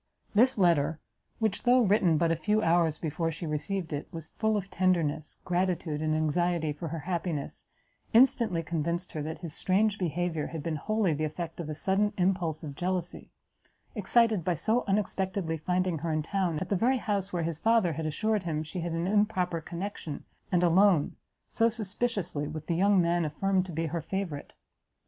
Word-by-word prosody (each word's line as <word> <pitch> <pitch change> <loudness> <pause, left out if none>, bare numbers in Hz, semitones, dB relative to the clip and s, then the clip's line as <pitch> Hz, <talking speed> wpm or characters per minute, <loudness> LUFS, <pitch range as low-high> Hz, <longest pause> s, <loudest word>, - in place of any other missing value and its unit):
This 240 +5 +4
letter, 160 -4 +3 0.4
which, 220 -3 -1
though 250 +1 +5
written 190 -6 +3
but 165 +1 +2
a - - +2
few 215 +4 +1
hours 165 -2 +3
before 165 +1 -2
she 165 +1 -6
received 160 +3 -2
it, 145 - -4
was 165 -2 -7
full 220 -1 0
of 195 -1 -5
tenderness, 165 -5 0
gratitude 175 -4 -1
and 155 0 +1
anxiety 155 0 +1
for 165 +3 -6
her 165 +2 -4
happiness, 170 -3 -3 0.4
instantly 225 -7 +4
convinced 170 +2 -2
her 155 - -4
that 155 +2 -4
his 165 -4 -6
strange 200 +4 +1
behaviour 170 -3 -1
had 160 -3 -6
been 160 -2 -2
wholly 215 +1 +1
the 155 +1 -2
effect 160 +2 -4
of 160 -3 -4
a 155 - -3
sudden 200 +5 +1
impulse 180 -4 0
of 145 -2 -6
jealousy; 180 +2 -3 0.6
excited 220 -2 +2
by 175 +1 +1
so 220 +9 +1
unexpectedly 190 -4 -1
finding 180 0 0
her 165 +1 -2
in 155 -1 0
town, 180 -2 -1
at 180 +3 -4
the 200 - +2
very 245 +7 +2
house 200 -4 -2
where 175 -2 -1
his 160 -1 -2
father 225 -6 +3
had 155 +1 -3
assured 215 +7 0
him 160 -3 -2
she 160 +4 -6
had 170 0 -3
an 165 +1 -1
improper 190 -4 +1
connexion, 170 -2 -6 0.3
and 180 -1 +3
alone, 175 -2 +4 0.3
so 230 0 +2
suspiciously, 205 -8 -2
with 155 0 -6
the 170 - -1
young 195 +2 +4
man 170 0 +2
affirmed 185 +5 0
to - - -6
be 165 +1 -2
her 165 +1 -2
favourite. 180 -5 -4
175 Hz, 185 wpm, -29 LUFS, 160-195 Hz, 0.6 s, though